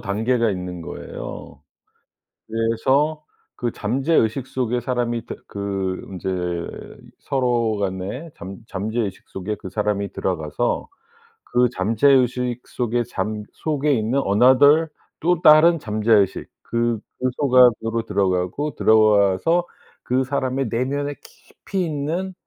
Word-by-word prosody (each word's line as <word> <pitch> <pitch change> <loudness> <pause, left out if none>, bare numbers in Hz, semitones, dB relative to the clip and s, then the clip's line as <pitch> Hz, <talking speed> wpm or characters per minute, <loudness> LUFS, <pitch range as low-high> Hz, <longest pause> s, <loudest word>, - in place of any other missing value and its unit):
단계가 115 +3 0
있는 90 -2 -5
거예요. 75 - -8 0.9
그래서 130 +7 +1 0.3
그 120 -1 -2
잠재의식 130 +1 0
속에 125 -2 -1
사람이 120 -1 -2
다 - - -6
그 95 -2 -3
인제 95 -1 -6 0.9
서로 120 -5 0
간의 100 - -4
잠 95 +3 -8
잠재의식 105 0 -3
속에 95 +3 -4
그 95 - -9
사람이 100 0 -1
들어가서 85 +4 -2 0.5
그 125 0 +2
잠재의식 125 +3 +2
속에 120 0 -1
잠 105 0 -4
속에 150 -2 0
있는 120 +4 +1
another 130 +9 +5 0.3
또 175 +1 +1
다른 165 +2 +7
잠재의식 105 -4 +1
그 115 -1 -1 0.2
그 130 - +1
속 135 -3 0
안으로 115 -2 +4
들어가고 100 +7 -1
들어와서 110 - +3 0.4
그 130 +1 +1
사람의 130 -1 -1
내면의 140 +5 -2
깊이 190 -2 -6
있는 165 +5 -3
120 Hz, 255 characters per minute, -22 LUFS, 105-135 Hz, 0.9 s, 다른